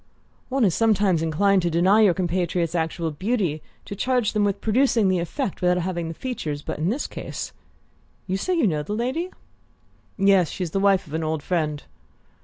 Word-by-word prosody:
"One 265 Hz, -2 st, +2 dB
is 185 Hz, -, +2 dB
sometimes 205 Hz, -6 st, +2 dB
inclined 190 Hz, +5 st, +2 dB
to 175 Hz, -, 0 dB
deny 185 Hz, +6 st, +4 dB
your 195 Hz, -5 st, +5 dB
compatriots 175 Hz, -2 st, -1 dB
actual 165 Hz, -1 st, -1 dB
beauty 185 Hz, -2 st, -1 dB, 0.2 s
to 200 Hz, -, -6 dB
charge 245 Hz, 0 st, 0 dB
them 210 Hz, -1 st, +2 dB
with 200 Hz, -1 st, 0 dB
producing 225 Hz, -2 st, +2 dB
the 185 Hz, -1 st, +2 dB
effect 195 Hz, -, -3 dB
without 180 Hz, 0 st, +3 dB
having 175 Hz, -1 st, -2 dB
the 165 Hz, -, -6 dB
features; 155 Hz, -, -4 dB
but -, -, -5 dB
in 160 Hz, +4 st, 0 dB
this 260 Hz, +7 st, -1 dB
case -, -, -6 dB, 0.7 s
you 190 Hz, -, -2 dB
say 360 Hz, -, -1 dB
you 330 Hz, -, +2 dB
know 155 Hz, -7 st, +1 dB
the 180 Hz, +8 st, -4 dB
lady?" 260 Hz, +10 st, -2 dB, 0.9 s
"Yes: 195 Hz, -4 st, +4 dB
she's 180 Hz, -4 st, -4 dB
the 195 Hz, -, 0 dB
wife 195 Hz, -1 st, +3 dB
of 150 Hz, -, -12 dB
an 160 Hz, 0 st, -1 dB
old 155 Hz, -1 st, -2 dB
friend." 155 Hz, -5 st, -1 dB
185 Hz, 190 wpm, -24 LUFS, 165-215 Hz, 0.9 s, your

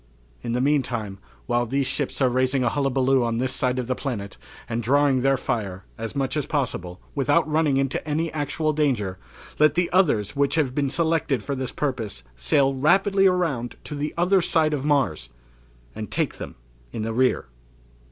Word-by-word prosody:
"In 115 Hz, -, -3 dB
the 125 Hz, -, 0 dB
meantime, 120 Hz, -8 st, 0 dB, 0.3 s
while 120 Hz, 0 st, 0 dB
these 135 Hz, +3 st, 0 dB
ships 135 Hz, +1 st, -2 dB
are 130 Hz, -, +4 dB
raising 130 Hz, +1 st, +1 dB
a 120 Hz, -, +2 dB
hullabaloo 135 Hz, -1 st, +2 dB
on 115 Hz, -1 st, -1 dB
this 130 Hz, +1 st, -1 dB
side 130 Hz, -2 st, 0 dB
of 125 Hz, -, -1 dB
the 130 Hz, -, 0 dB
planet, 110 Hz, -8 st, -5 dB, 0.3 s
and 115 Hz, 0 st, -2 dB
drawing 135 Hz, +2 st, +3 dB
their 135 Hz, +1 st, +3 dB
fire, 100 Hz, -7 st, -3 dB
as 115 Hz, +4 st, -6 dB
much 135 Hz, 0 st, -1 dB
as 150 Hz, -3 st, -1 dB
possible, 95 Hz, -, -2 dB
without 145 Hz, +2 st, +2 dB
running 155 Hz, -3 st, +2 dB
into 135 Hz, 0 st, -1 dB
any 155 Hz, +2 st, -1 dB
actual 155 Hz, +1 st, -1 dB
danger, 120 Hz, -11 st, 0 dB, 0.4 s
let 150 Hz, -1 st, +5 dB
the 175 Hz, 0 st, +1 dB
others 140 Hz, -, +2 dB
which 140 Hz, +1 st, +1 dB
have 145 Hz, -6 st, +1 dB
been 140 Hz, 0 st, 0 dB
selected 160 Hz, -6 st, 0 dB
for 140 Hz, -, -3 dB
the 130 Hz, -1 st, -3 dB
purpose, 115 Hz, -, -3 dB
sail 135 Hz, -, +2 dB
rapidly 195 Hz, +8 st, +3 dB
around 165 Hz, -10 st, 0 dB
to -, -, -7 dB
the 145 Hz, +1 st, -2 dB
other 180 Hz, +2 st, +3 dB
side 160 Hz, -2 st, +2 dB
of 140 Hz, -3 st, -2 dB
Mars 135 Hz, -, +1 dB, 0.6 s
and -, -, -6 dB
take -, -, -2 dB
them -, -, -7 dB, 0.4 s
in 110 Hz, -, -4 dB
the 115 Hz, 0 st, -2 dB
rear." 130 Hz, +2 st, +2 dB
135 Hz, 180 wpm, -24 LUFS, 120-150 Hz, 0.6 s, let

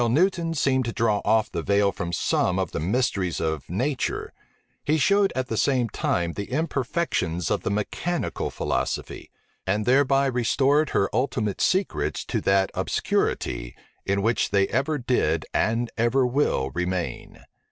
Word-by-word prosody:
While 120 Hz, -, +2 dB
Newton 165 Hz, +4 st, +1 dB
seemed 130 Hz, -3 st, +1 dB
to 115 Hz, -, -2 dB
draw 115 Hz, -3 st, +1 dB
off 110 Hz, 0 st, +2 dB
the -, -, -2 dB
veil 100 Hz, 0 st, +2 dB
from 85 Hz, -1 st, -4 dB
some 90 Hz, +1 st, +1 dB
of 95 Hz, -3 st, -1 dB
the -, -, -3 dB
mysteries 95 Hz, -, 0 dB
of 80 Hz, -3 st, -2 dB
nature, 125 Hz, -, -2 dB, 0.5 s
he 155 Hz, +2 st, +2 dB
showed 200 Hz, +6 st, +3 dB
at 130 Hz, 0 st, 0 dB
the 115 Hz, -, -3 dB
same 125 Hz, -3 st, +2 dB
time 85 Hz, -4 st, -1 dB
the 100 Hz, -, -5 dB
imperfections 130 Hz, -, -1 dB
of -, -, +1 dB
the -, -, -2 dB
mechanical 105 Hz, -, -2 dB
philosophy; -, -, -3 dB, 0.4 s
and 105 Hz, +3 st, 0 dB
thereby 135 Hz, +1 st, +3 dB
restored 135 Hz, +4 st, +2 dB
her 100 Hz, -, +2 dB
ultimate 110 Hz, -4 st, -1 dB
secrets 190 Hz, +2 st, 0 dB
to -, -, -2 dB
that 95 Hz, 0 st, +2 dB
obscurity, -, -, -1 dB, 0.3 s
in 100 Hz, 0 st, 0 dB
which 115 Hz, +2 st, +1 dB
they 100 Hz, -1 st, +2 dB
ever 140 Hz, +5 st, 0 dB
did 100 Hz, -, 0 dB
and 115 Hz, +2 st, 0 dB
ever 120 Hz, +3 st, +3 dB
will 125 Hz, -, 0 dB
remain. 90 Hz, +3 st, -4 dB
115 Hz, 150 wpm, -25 LUFS, 95-135 Hz, 0.5 s, showed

